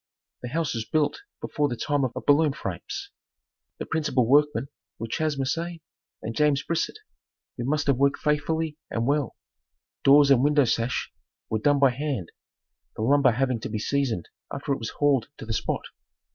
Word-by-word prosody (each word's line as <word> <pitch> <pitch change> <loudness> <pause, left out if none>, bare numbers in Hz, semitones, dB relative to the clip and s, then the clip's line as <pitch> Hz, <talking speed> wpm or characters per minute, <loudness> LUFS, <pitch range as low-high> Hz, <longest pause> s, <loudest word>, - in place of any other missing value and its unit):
The 125 - -5
house 160 +2 -1
was 115 -2 -2
built 155 - 0 0.2
before 150 -2 0
the 120 - -2
time 145 +3 0
of 125 - -2
baloon 145 0 +4
frames. 400 - -6 0.7
The - - -5
principal 150 -6 +1
workmen 145 +2 +3 0.3
were 115 - -4
Chas. 150 +5 -1
Merceau 165 +6 -2 0.5
and 110 +1 -4
James 145 +1 +2
Brisette, 170 - -2 0.6
who 120 - -4
must 145 +2 0
have 140 -3 +2
worked 140 +1 +3
faithfully 150 +1 -1
and 115 0 -1
well. 145 -1 0 0.7
Doors 140 0 +7
and 130 -2 +5
window 145 -1 +4
sash 115 +1 -1 0.4
were 110 - +1
done 145 +5 +3
by 135 -2 +5
hand, 130 - -3 0.6
the 110 - -3
lumber 135 0 +4
having 130 0 0
to - - -5
be 110 - -3
seasoned 120 -5 -1 0.2
after 140 0 -2
it 135 - -3
was 115 - -4
hauled 140 -5 +1
to - - -8
the 110 - -3
spot. - - -2
140 Hz, 175 wpm, -26 LUFS, 120-150 Hz, 0.7 s, Doors